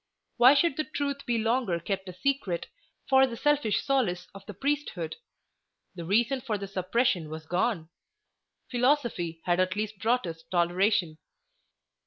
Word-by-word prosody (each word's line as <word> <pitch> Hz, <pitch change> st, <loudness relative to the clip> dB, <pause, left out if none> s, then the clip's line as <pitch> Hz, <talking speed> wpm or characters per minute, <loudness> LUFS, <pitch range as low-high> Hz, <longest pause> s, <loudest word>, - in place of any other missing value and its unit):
Why 250 Hz, +4 st, +8 dB
should 305 Hz, 0 st, +2 dB
the 310 Hz, -, +1 dB
Truth 280 Hz, -2 st, -4 dB
be 240 Hz, -1 st, +1 dB
longer 225 Hz, -5 st, +1 dB
kept 190 Hz, +2 st, -4 dB
a -, -, -7 dB
secret 205 Hz, -5 st, -1 dB, 0.4 s
for 265 Hz, 0 st, +5 dB
the 235 Hz, -2 st, -6 dB
selfish 295 Hz, -8 st, +1 dB
solace 225 Hz, -11 st, 0 dB
of 195 Hz, 0 st, -11 dB
the 205 Hz, -, -6 dB
priesthood? 270 Hz, -, -2 dB, 0.8 s
The 170 Hz, -3 st, -7 dB
reason 235 Hz, +8 st, +2 dB
for 220 Hz, -5 st, -2 dB
the 200 Hz, -, -5 dB
suppression 190 Hz, -2 st, 0 dB
was 160 Hz, 0 st, -7 dB
gone. 180 Hz, 0 st, 0 dB, 0.8 s
Philosophy 240 Hz, -, 0 dB
had 175 Hz, 0 st, +2 dB
at 185 Hz, +1 st, +1 dB
least 215 Hz, -1 st, -3 dB
brought 240 Hz, +1 st, +1 dB
us 165 Hz, -1 st, -6 dB
toleration. 175 Hz, -1 st, +1 dB
210 Hz, 150 wpm, -28 LUFS, 180-260 Hz, 0.8 s, Why